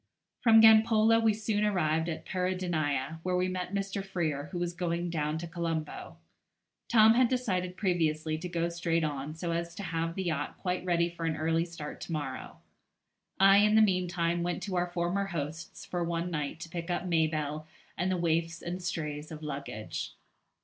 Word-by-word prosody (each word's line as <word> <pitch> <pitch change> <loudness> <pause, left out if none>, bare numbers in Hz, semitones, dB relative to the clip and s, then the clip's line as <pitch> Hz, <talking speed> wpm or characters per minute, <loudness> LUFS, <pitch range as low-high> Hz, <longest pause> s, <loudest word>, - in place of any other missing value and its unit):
From 225 -2 +7
Gampola 220 0 +6
we 225 -1 +4
soon 215 0 -1
arrived 165 -5 +1
at 160 - -5
Peradeniya, 165 -6 -1
where 180 +1 -1
we 180 0 +1
met 185 -1 -3
Mr. 195 0 -2
Freer, 160 -7 -2
who 175 - -6
was 175 0 -2
going 175 0 -2
down 150 -1 -1
to 165 - -5
Colombo. 165 -2 -4 0.7
Tom 220 -1 +7
had 250 +1 +4
decided 185 -8 -1
previously 160 -5 0
to 180 +2 -5
go 170 -1 0
straight 170 -1 0
on, 145 0 -3
so 170 +1 -3
as 170 0 -3
to 200 - -6
have 165 -1 -2
the 190 - -2
yacht 155 -5 -2
quite 180 -1 -2
ready 170 -1 +2
for 170 -1 -4
an 160 - 0
early 165 +2 +1
start 165 -4 -8
to - - -6
morrow. 145 -5 -4 0.8
I 195 +1 +7
in 210 +1 +5
the 220 - +7
meantime 175 -3 +1
went 175 0 -2
to 195 -3 -3
our 175 0 +1
former 175 +3 -1
hosts 160 -2 -5
for 175 -1 -2
one 170 +1 -2
night 150 -1 -3
to 165 - -7
pick 170 0 -5
up 175 - -1
Mabelle 155 -3 0 0.3
and 185 +2 0
the 185 - +1
waifs 165 -1 0
and 180 +2 -4
strays 150 -3 -4
of 155 0 -8
luggage. 140 -7 -5
170 Hz, 185 wpm, -30 LUFS, 160-185 Hz, 0.8 s, From